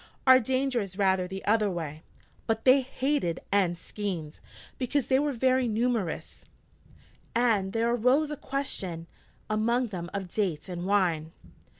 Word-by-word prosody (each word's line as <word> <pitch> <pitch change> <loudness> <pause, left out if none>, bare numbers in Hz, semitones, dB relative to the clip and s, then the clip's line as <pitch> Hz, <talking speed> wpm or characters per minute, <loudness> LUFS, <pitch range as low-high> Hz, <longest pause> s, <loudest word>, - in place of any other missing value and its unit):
(Our 260 -1 +8
danger 260 0 0
is 195 -2 -7
rather 190 -2 +2
the 190 +1 -7
other 210 -1 +3
way.) 160 -4 -5 0.5
But 225 0 -1
they 265 +1 +7
hated 260 - -1
and 185 -4 +2
schemed, 175 -5 -5 0.4
because 265 +1 0
they 260 0 +3
were 295 0 +1
very 260 0 +2
numerous, 225 -5 -2 0.9
and 220 -5 +2
there 230 +2 +1
arose 260 +6 +2
a - - -2
question 200 - -4 0.4
among 235 +3 +1
them 175 -3 -5
of 200 -2 -4
dates 180 -5 -2
and 175 0 -4
wine.' 170 -6 +1
215 Hz, 140 wpm, -28 LUFS, 185-255 Hz, 0.9 s, Our